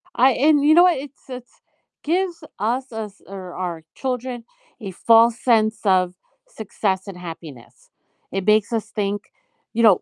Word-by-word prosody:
I 260 +2 +5
and 290 +3 +3
you 305 +1 +6
know 350 +2 +7
what, 360 -4 +4
it's 275 0 -11
it's 250 -1 -9 0.5
gives 345 0 -1 0.2
us 245 +5 -1
as 215 -3 -7
or 190 -2 -8
our 175 -3 -4
children 250 -2 -4 0.4
a 200 -4 -6
false 230 +4 +4
sense 220 -3 +2
of 185 -2 +3 0.3
success 195 -2 -3
and 190 -2 -8
happiness. 165 -8 -11 0.4
It 195 -1 -3
makes 215 +1 +3
us 225 - -1
think, 205 0 -2 0.5
you 230 +1 +1
know, 205 -5 +6
220 Hz, 155 wpm, -21 LUFS, 190-255 Hz, 0.5 s, know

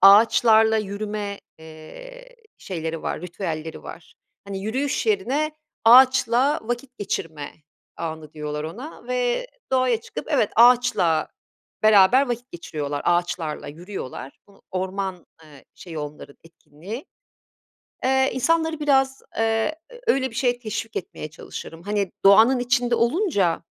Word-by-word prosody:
ağaçlarla 220 +2 +6
yürüme, 205 -1 -4 0.2
eee, - - -12 0.2
şeyleri 165 -3 -5
var, - - -3
ritüelleri 165 -3 -5
var. 165 - -11 0.3
Hani, 200 -1 -5
yürüyüş 265 - -1
yerine 310 -8 +1 0.3
ağaçla 255 +3 +6
vakit 245 +2 -5
geçirme 160 -7 -4 0.5
anı 160 -2 -6
diyorlar 150 0 -5
ona 235 - -8
ve 250 - 0 0.3
doğaya 255 -3 +2
çıkıp, - - -7
evet, 255 -8 +2
ağaçla 235 -9 +4 0.5
beraber 215 +6 +6
vakit 240 +1 -4
geçiriyorlar, 145 -4 -4
ağaçlarla 175 -3 -1
yürüyorlar. 155 -5 -8
Bunu 200 - -22
orman, 190 -1 -3 0.2
eee, 145 -3 -16
şeyi 165 -4 -9
onların 150 -1 -8
etkinliği. 170 - -10 1.0
Eee, 265 +1 +3
insanları 320 +4 +1
biraz, 270 -2 +2 0.2
eee, 225 +6 +1 0.3
öyle 265 - +2
bir 225 - -13
şeye 245 0 +1
teşvik 225 -1 -5
etmeye 155 -3 -6
çalışırım. 165 +2 -9
Hani, 205 -2 -1
doğanın 225 +6 +7
içinde 245 -1 +1
olunca 235 - +1
215 Hz, 115 wpm, -23 LUFS, 170-255 Hz, 1.0 s, doğanın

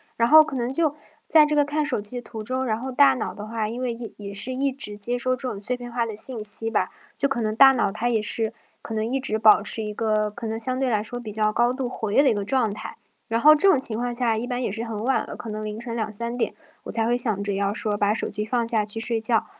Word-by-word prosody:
然 230 - +2
后 310 +4 +8
可 285 -3 -7
能 245 +1 -2
就 310 -1 +1 0.3
在 310 -2 +6
这 300 0 0
个 290 - +4
看 295 +1 -1
手 255 -8 -1
机 210 +4 -3
的 - - -9
途 225 -1 -8
中， 255 +4 -2
然 220 -1 -1
后 265 +1 -5
大 140 - +5
脑 - - -4
的 210 - -8
话， 220 -1 -3
因 235 +3 -6
为 245 -2 -2
一 230 -1 -9
也 200 -1 -8
是 200 +6 0
一 275 +1 0
直 255 -7 0
接 240 +4 -1
收 255 +1 +1
这 255 +1 -4
种 205 -5 -5
碎 250 +4 -2
片 245 -1 -9
化 235 -1 -1
的 220 - -6
信 225 +1 -4
息 225 +2 +1
吧， - - 0 0.3
就 280 - +1
可 265 -3 -2
能 215 0 -2
大 270 +2 +7
脑 235 -6 0
它 235 +4 -2
也 225 -2 +1
是 220 +1 0 0.3
可 225 - -7
能 215 0 -1
一 260 +4 -1
直 220 -4 0
保 215 -1 +6
持 220 +1 +3
一 210 - -5
个， 215 -1 0
可 225 +2 -7
能 220 +1 -4
相 255 +2 +1
对 265 -1 0
来 215 -3 0
说 245 +2 -4
比 220 -3 -8
较 215 0 0
高 240 +1 +2
度 255 0 -3
活 225 -4 -5
跃 275 - +4
的 275 - +4
一 - - +1
个 205 - -3
状 225 0 +1
态。 - - -9 0.3
然 225 +1 0
后 305 +3 +8
这 380 +6 +4
种 290 - +4
情 225 -4 0
况 240 0 -3
下 235 -3 0
一 235 +3 -4
般 250 0 -3
也 235 - -2
是 225 +3 -4
很 220 -2 -5
晚 265 +2 +1
了， - - -7
可 230 - -8
能 215 0 -5
凌 215 0 -5
晨 235 0 -6
2-3 230 +1 -3
点， 245 - -2 0.3
我 - - -7
才 225 -1 -1
会 240 +1 +1
想 220 -5 +1
着 200 0 -2
要 200 0 -1
说 210 0 0
把 205 0 +1
手 215 - -1
机 210 +1 +1
放 235 +1 -1
下 225 -2 +2
去 210 +2 -3
睡 225 0 +4
觉。 225 -1 +1
230 Hz, 320 characters per minute, -23 LUFS, 215-255 Hz, 0.3 s, 后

